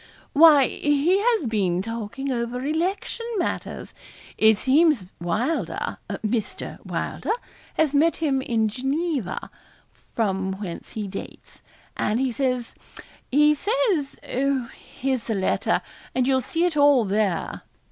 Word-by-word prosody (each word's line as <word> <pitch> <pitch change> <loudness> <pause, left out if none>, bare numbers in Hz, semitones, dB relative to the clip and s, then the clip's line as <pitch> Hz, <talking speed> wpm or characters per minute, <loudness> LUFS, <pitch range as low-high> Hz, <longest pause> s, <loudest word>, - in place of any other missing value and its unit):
'Why, 295 -3 +8
he 295 +9 +2
has 445 - +2
been 190 -5 0
talking 230 +5 -4
over 245 +1 -2
election 365 +9 -2
matters. 350 - -3 0.4
It 220 -1 +5
seems 280 - +3
Wylder 215 - -2 0.3
Mr. 215 -1 -3
Wylder 440 - -2 0.4
has 310 -3 +2
met 315 +4 +3
him 280 -5 +1
in 225 -4 +1
Geneva, 270 - -2 0.6
from 190 -4 0
whence 190 -3 -7
he 215 -3 -3
dates; 195 - -8 0.3
and 215 +3 0
he 265 -1 +1
says 250 -1 -1 0.6
he 300 +3 +5
says 405 - 0
oh, 265 -2 0
here's 260 -4 -3
the 225 - -1
letter, 190 -1 +1 0.3
and 255 - +2
you'll 260 0 +3
see 335 +6 0
it 350 -3 0
all 285 -5 +5
there.' 200 -2 -1
260 Hz, 125 wpm, -24 LUFS, 220-300 Hz, 0.6 s, Why